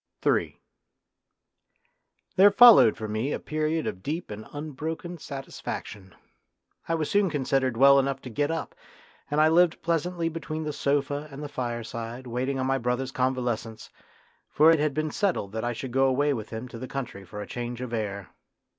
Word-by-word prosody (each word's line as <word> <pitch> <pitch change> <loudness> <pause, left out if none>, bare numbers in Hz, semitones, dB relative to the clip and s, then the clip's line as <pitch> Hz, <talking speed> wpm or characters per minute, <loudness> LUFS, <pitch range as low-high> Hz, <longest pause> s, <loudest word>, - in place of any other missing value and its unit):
Ill - - +3 1.9
There 195 +2 +8
followed 215 - +8
for 110 - -5
me 110 +6 -2
a - - -1
period 155 +1 -1
of 90 - -4
deep 155 - -4
and 105 +1 -8
unbroken 155 +4 -5
satisfaction. 110 -8 -7 0.7
I 165 - +2
was 155 -2 -1
soon 200 -2 +2
considered 135 -4 0
well 140 +2 +7
enough 135 0 -1
to 125 - -8
get 145 +6 0
up, 165 0 -3 0.6
and 145 - 0
I 155 - +6
lived 170 +1 +3
pleasantly 170 +1 0
between 160 -1 -4
the 150 -1 -3
sofa 145 +1 -1
and 140 +2 -8
the - - -4
fireside 120 -1 -5
waiting 125 +3 -2
on 130 - -1
my 135 0 +1
brother's 125 +2 -1
convalescence, 125 -4 -2 0.6
for 155 +2 +6
it 165 - +3
had 150 -2 0
been 155 0 -1
settled 175 - -1
that 110 +1 -4
I 120 0 -1
should 125 +2 -6
go 135 +2 +3
away 140 +2 +2
with 110 -4 -5
him 110 +2 -6
to 115 - -9
the 130 - -6
country 125 -8 -6
for 95 +3 -9
a 105 - -5
change 120 +1 -5
of 125 -2 -5
air. 100 -4 -4
135 Hz, 180 wpm, -26 LUFS, 120-155 Hz, 1.9 s, There